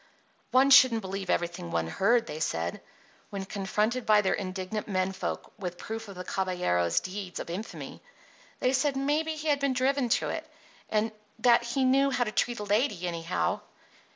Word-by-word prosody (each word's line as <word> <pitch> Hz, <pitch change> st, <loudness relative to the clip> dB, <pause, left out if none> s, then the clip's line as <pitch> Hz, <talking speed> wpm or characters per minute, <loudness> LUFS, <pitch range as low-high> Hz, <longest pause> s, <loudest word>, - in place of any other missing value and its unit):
One 260 Hz, +2 st, +4 dB
shouldn't 255 Hz, -4 st, +7 dB
believe 190 Hz, -1 st, -5 dB
everything 170 Hz, -, -1 dB
one 85 Hz, -1 st, 0 dB
heard, 230 Hz, -, +2 dB
they 155 Hz, -, -6 dB
said. 85 Hz, -, -2 dB, 0.5 s
When 195 Hz, -1 st, -5 dB
confronted 210 Hz, +5 st, -1 dB
by 215 Hz, -1 st, +5 dB
their 190 Hz, -, +1 dB
indignant 190 Hz, +2 st, -4 dB
men 185 Hz, -2 st, 0 dB
folk 190 Hz, -, -5 dB
with 180 Hz, -3 st, -5 dB
proof 225 Hz, +3 st, -6 dB
of 200 Hz, -, -9 dB
the 180 Hz, -, -6 dB
caballero's 180 Hz, -, 0 dB
deeds 190 Hz, -1 st, -6 dB
of -, -, -5 dB
infamy, 205 Hz, +6 st, -6 dB, 0.6 s
they 255 Hz, -, +2 dB
said 275 Hz, 0 st, +1 dB
maybe 300 Hz, +3 st, 0 dB
he 310 Hz, 0 st, -3 dB
had 285 Hz, -1 st, +3 dB
been 275 Hz, -1 st, +1 dB
driven 260 Hz, 0 st, +1 dB
to -, -, -3 dB
it, 315 Hz, -1 st, -5 dB, 0.4 s
and 220 Hz, +1 st, +1 dB, 0.3 s
that 235 Hz, +1 st, +5 dB
he 240 Hz, +3 st, -1 dB
knew 275 Hz, +2 st, +4 dB
how 250 Hz, -2 st, +1 dB
to 215 Hz, -, -3 dB
treat 240 Hz, +2 st, 0 dB
a -, -, -3 dB
lady, 205 Hz, -3 st, +1 dB
anyhow. 165 Hz, -, -1 dB
210 Hz, 180 wpm, -28 LUFS, 185-255 Hz, 0.6 s, shouldn't